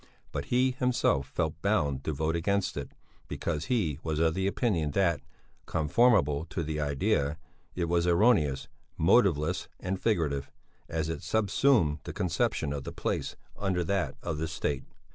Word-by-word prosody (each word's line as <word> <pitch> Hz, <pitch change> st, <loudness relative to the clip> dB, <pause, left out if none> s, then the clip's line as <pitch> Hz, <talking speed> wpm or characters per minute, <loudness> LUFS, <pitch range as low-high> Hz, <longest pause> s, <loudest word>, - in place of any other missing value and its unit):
But 70 Hz, -, -3 dB
he 125 Hz, -, +2 dB
himself 125 Hz, -, +1 dB
felt 80 Hz, +2 st, -2 dB
bound 75 Hz, -10 st, +1 dB
to -, -, 0 dB
vote 80 Hz, +3 st, -1 dB
against 100 Hz, +3 st, 0 dB
it, 70 Hz, -1 st, -5 dB, 0.4 s
because 80 Hz, -2 st, -3 dB
he 95 Hz, -, 0 dB
was 80 Hz, -2 st, -2 dB
of 80 Hz, 0 st, +3 dB
the 95 Hz, +2 st, 0 dB
opinion 100 Hz, -, 0 dB
that, 85 Hz, -4 st, +2 dB, 0.5 s
conformable 80 Hz, -, +3 dB
to 85 Hz, 0 st, -4 dB
the 75 Hz, 0 st, -3 dB
idea, 70 Hz, +1 st, 0 dB, 0.4 s
it 90 Hz, -, 0 dB
was 85 Hz, +1 st, +1 dB
erroneous, 85 Hz, -, +3 dB, 0.3 s
motiveless 90 Hz, -2 st, +3 dB
and 95 Hz, +1 st, -3 dB
figurative, 75 Hz, -10 st, 0 dB, 0.4 s
as 80 Hz, -1 st, -1 dB
it 80 Hz, -2 st, -4 dB
subsumed 110 Hz, -, +2 dB
the -, -, -5 dB
conception 80 Hz, -5 st, 0 dB
of 70 Hz, -1 st, -4 dB
the -, -, -6 dB
place -, -, -2 dB, 0.2 s
under 95 Hz, -3 st, 0 dB
that 95 Hz, +2 st, -1 dB
of 80 Hz, -3 st, -3 dB
the 80 Hz, -, -1 dB
State. 70 Hz, -3 st, -2 dB
80 Hz, 155 wpm, -29 LUFS, 75-100 Hz, 0.5 s, of